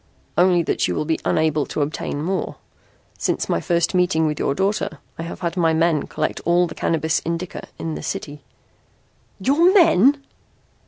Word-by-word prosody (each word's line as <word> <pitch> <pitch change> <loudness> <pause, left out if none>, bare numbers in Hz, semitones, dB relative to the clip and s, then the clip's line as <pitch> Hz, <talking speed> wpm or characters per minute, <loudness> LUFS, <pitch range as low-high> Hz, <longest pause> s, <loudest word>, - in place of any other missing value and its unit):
"Only 180 -1 +4
that - - 0
you 90 - -2
will - - -1
be 160 +1 0
unable 155 -2 +1
to 150 - -1
obtain 145 0 -4
more. 185 0 -2 0.6
Since - - -1
my 85 - 0
first 170 -1 +1
meeting 180 -3 +2
with 150 -1 -1
your 140 - 0
daughter 195 -5 -1 0.2
I - - -2
have 165 +2 -7
had 170 0 -2
my 165 -3 +2
men 160 -2 +1
collect - - -3
all 175 +1 +3
the 165 - -7
Cannabis 160 -1 0
Indica 170 +2 -4
in 165 -1 -4
the - - -5
city." 145 0 -5 1.0
"Your 295 - +4
men!" 280 - +5
165 Hz, 170 wpm, -21 LUFS, 155-185 Hz, 1.0 s, men